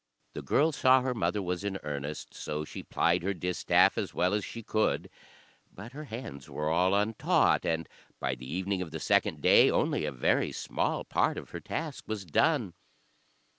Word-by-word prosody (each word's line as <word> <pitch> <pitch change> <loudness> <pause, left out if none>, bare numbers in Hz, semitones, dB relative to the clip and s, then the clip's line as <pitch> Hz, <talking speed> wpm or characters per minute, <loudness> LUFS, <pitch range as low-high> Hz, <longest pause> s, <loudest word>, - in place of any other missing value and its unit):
The - - -5
girl 155 +3 +2
saw 130 -2 +4
her 130 0 -1
mother 105 -3 -1
was 90 +1 -3
in 100 -1 -2
earnest, 75 0 -5
so 75 0 -4
she - - -8
plied 85 +2 +1
her 100 +3 -1
distaff 90 0 +2
as - - -4
well 90 +2 +2
as 105 -1 0
she 115 +4 -7
could; 110 +1 0 0.6
but 105 +5 -10
her 150 +3 -8
hands 110 - -8
were 75 +1 -2
all 90 +4 +3
untaught, 105 +2 +2
and 80 -1 -1 0.3
by 65 0 -1
the 65 +1 -8
evening 95 +2 -1
of 90 - -4
the 80 +1 -6
second - - +1
day - - +7
only - - +1
a 75 - -2
very 65 -3 +1
small - - -2
part - - 0
of - - -8
her - - -5
task 155 -4 -5
was 110 -3 -4
done. 110 - +1
95 Hz, 185 wpm, -29 LUFS, 80-110 Hz, 0.6 s, day